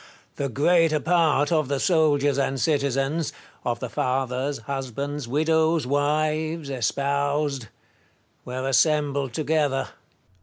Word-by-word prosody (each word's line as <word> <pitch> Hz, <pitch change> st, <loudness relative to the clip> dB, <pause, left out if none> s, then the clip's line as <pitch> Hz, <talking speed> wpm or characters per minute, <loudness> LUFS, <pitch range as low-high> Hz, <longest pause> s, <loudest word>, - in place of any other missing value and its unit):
The 140 Hz, -1 st, -2 dB
greater 155 Hz, +4 st, +3 dB
part 160 Hz, -3 st, +2 dB
of 155 Hz, -4 st, +2 dB
the 140 Hz, 0 st, -1 dB
soldiers 145 Hz, -5 st, +2 dB
and 135 Hz, -1 st, 0 dB
citizens 140 Hz, +1 st, 0 dB, 0.2 s
— -, -, -30 dB
of 120 Hz, -1 st, -2 dB
the 125 Hz, -, -4 dB
fathers, 130 Hz, +2 st, -1 dB
husbands, 140 Hz, +2 st, -4 dB
widows, 160 Hz, +2 st, +2 dB
wives, 155 Hz, +2 st, 0 dB
espoused 140 Hz, +1 st, -1 dB, 0.4 s
— -, -, -40 dB
were 130 Hz, +1 st, -4 dB
assembled 140 Hz, -2 st, +2 dB
together. 145 Hz, -1 st, 0 dB
145 Hz, 115 wpm, -24 LUFS, 135-155 Hz, 0.4 s, greater